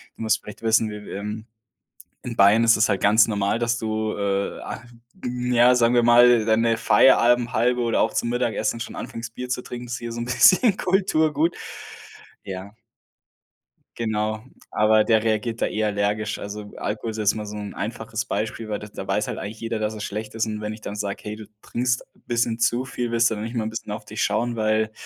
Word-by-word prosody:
du - - -7
musst 110 - +1
vielleicht 105 +2 -11
wissen, 110 -1 +3
w 105 0 -8
w - - -10
ähm, 105 +2 -5 0.8
in 120 -2 -5
Bayern 105 +3 +5
ist 115 0 +6
es 105 - +3
halt 100 - 0
ganz 110 +3 +5
normal, 100 0 0
dass 120 0 0
du, 110 -1 -2
äh, 100 -1 -1
ah 110 - -7 0.4
n 125 0 -2
ja, 120 +1 +6
sagen 120 0 +3
wir 120 - +4
mal, 120 -1 +6
deine 115 +1 +2
Feierabendhalbe 120 +2 +4
oder 115 -1 +1
auch - - +1
zum 120 - -1
Mittagessen 115 -2 -1
schon 120 - -6
anfängst, 115 0 -7
Bier 125 0 -6
zu 125 0 -2
trinken, 120 0 -7
ist 120 - -4
hier 120 -1 -6
so 115 - -5
'n - - -3
bisschen 185 - +5
Kulturgut. 165 -4 +1 0.9
Ja 95 +2 -8 1.2
Genau, 110 -1 -2 0.3
aber 110 0 +4
der 110 0 +2
reagiert 110 +1 -1
da - - +2
eh 110 - -2
allergisch. 105 +1 -1
Also, 105 0 -7
Alkohol 110 +2 -3
ist 110 - -6
jetzt 105 -1 +2
mal 105 -1 -5
so 105 +1 -7
'n 105 -1 -6
einfaches 110 +1 -4
Beispiel, 110 +1 -3
weil 105 - -2
da 105 - -9
da 105 - -8
weiß - - 0
halt - - -4
eigentlich 105 +3 -6
jeder, 115 -1 -3
dass 110 0 -1
er 110 - -8
schlecht 105 +1 -5
ist. 115 0 0
Und 105 -1 -4
wenn 105 0 -4
ich 110 - -9
dann 100 - -5
sage: 100 -1 -4
„Hey, 105 0 -4
du 110 -1 -10 0.2
trinkst 125 +1 -1
bisschen 115 -1 -2
zu 120 +2 +2
viel, 120 -3 -4
willst 115 0 +3
du - - -1
dann 105 - -5
nicht 115 +2 -6
mal 110 -1 -1
bisschen 110 - -6
auf - - -6
dich - - -4
schauen, 120 +1 0
weil, 110 0 +1
110 Hz, 215 wpm, -23 LUFS, 105-120 Hz, 1.2 s, ist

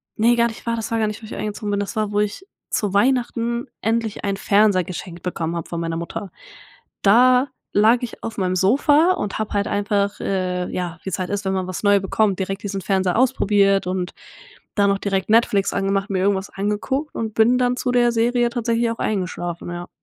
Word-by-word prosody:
ne, 235 +2 +4
gar 235 0 +4
nicht 225 - -9
wahr, 230 0 -1
das 225 - -4
war 225 - +1
gar 215 - +2
nicht, 215 +2 -5
wo - - -10
ich - - -8
eingezogen 210 0 -4
bin 205 0 0
das 200 - -5
war, 210 -1 0
wo 205 - +2
ich 210 - -3 0.2
zu 205 -2 -1
Weihnachten 235 +1 +1
endlich 225 -1 -1
einen 200 -1 -1
Fernseher 200 -4 +3
geschenkt 175 -1 -7
bekommen 170 -2 -3
habe 165 - -5
von 170 - -4
meiner 165 0 -2
Mutter. 170 +2 -6 0.7
Da 250 +6 +5 0.2
lag 220 +4 +5
ich 240 - -7
auf 225 - -5
meinem 185 -1 0
Sofa 290 - +4
und 205 - -3
habe 215 -1 -3
halt 200 0 0
einfach, 200 0 0
äh, 180 -2 -1
ja, 175 -2 -4
wie's 190 -1 -3
halt 185 -1 -3
ist, 205 0 -2
wenn 190 - 0
man 185 -1 -2
was 185 - -5
neu 205 -1 +5
bekommt, 195 0 +1
direkt 195 +1 -3
diesen 195 -1 -3
Fernseher 190 0 0
ausprobiert 200 -7 +3
und 185 -1 -2 0.6
dann 200 -1 +3
noch 195 - +1
direkt 195 0 -1
Netflix 215 -3 +3
angemacht, 195 +1 0
mir 190 -2 0
irgendwas 195 0 0
angeguckt 210 +9 -2
und 220 -1 -3
bin 230 +3 +4
dann 250 0 +1
zu 250 0 -1
der 240 -1 +3
Serie 240 +1 +2
tatsächlich 235 -1 0
auch 230 - -6
eingeschlafen, 180 -4 -3
ja. 175 0 -6
205 Hz, 210 wpm, -21 LUFS, 190-230 Hz, 0.7 s, Da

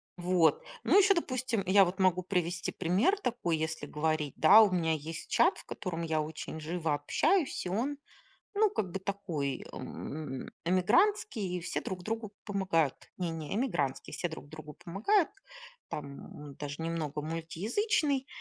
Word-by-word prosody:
Вот. 175 -3 +3 0.2
Ну - - +5
ещё, 405 0 +7
допустим, 255 - -1
я 195 +1 +7
вот 180 +3 -4
могу 185 -1 +3
привести 175 -2 -1
пример 205 - +2
такой, 240 - -1
если 160 -1 -3
говорить, 150 -1 -1
да. 200 +8 +9
У 210 -3 +5
меня 165 -3 +1
есть 160 +1 -5
чат, 360 - +4
в - - -11
котором 175 -4 -4
я 160 -1 0
очень 155 +1 -6
живо 160 -1 -1
общаюсь, 275 - +1
и 180 - -2
он, 255 +9 -1 0.6
ну 425 0 +4
как 190 - -2
бы 195 - -3
такой, 175 -9 -3
эм, 150 -3 -6 0.2
эмигрантский, 210 - +2
и - - -5
все 175 - -2
друг 185 -1 -5
другу 220 0 -3
помогают. 185 - +1 0.2
Не, 175 -3 -2
не, 160 +2 -4
эмигрантский. 170 - -1
Все 175 - -1
друг 160 -2 -9
другу 155 -2 -10
помогают. 245 - +2 0.6
Там 140 0 -8
даже 145 +2 -5
немного 160 -3 -2
мультиязычный. 235 - 0
180 Hz, 155 wpm, -31 LUFS, 160-215 Hz, 0.6 s, да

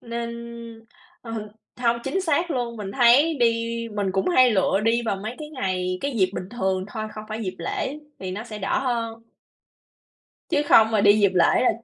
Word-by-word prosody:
nên, 235 0 -5 0.9
ờ, 225 -2 -6 0.3
hông, 235 -1 +1
chính 385 - -1
xác 335 -1 0
luôn, 240 -4 -2
mình 200 -3 -6
thấy 260 +7 +5
đi 235 - +6 0.5
mình 200 -2 -1
cũng 190 - 0
hay 255 -8 +5
lựa 195 -1 +2
đi 230 +1 +2
vào 200 - 0
mấy 215 +5 -6
cái 305 -1 -7
ngày, 185 -8 -2
cái 280 - -2
dịp 185 -3 +2
bình 185 - -5
thường 190 -5 -1
thôi, 215 0 -5
không 215 - -8
phải 220 +1 -4
dịp 185 -3 -4
lễ 265 - -3 0.2
thì 190 -1 -5
nó 205 +4 -5
sẽ 215 -3 -8
đỡ 195 -1 0
hơn. 230 -3 -2 1.3
Chứ 290 - +2
không 220 0 +6
mà 215 -2 +2
đi 205 +1 +5
dịp 200 -2 +4
lễ 180 - +4
là - - +4
225 Hz, 200 wpm, -24 LUFS, 195-245 Hz, 1.3 s, đi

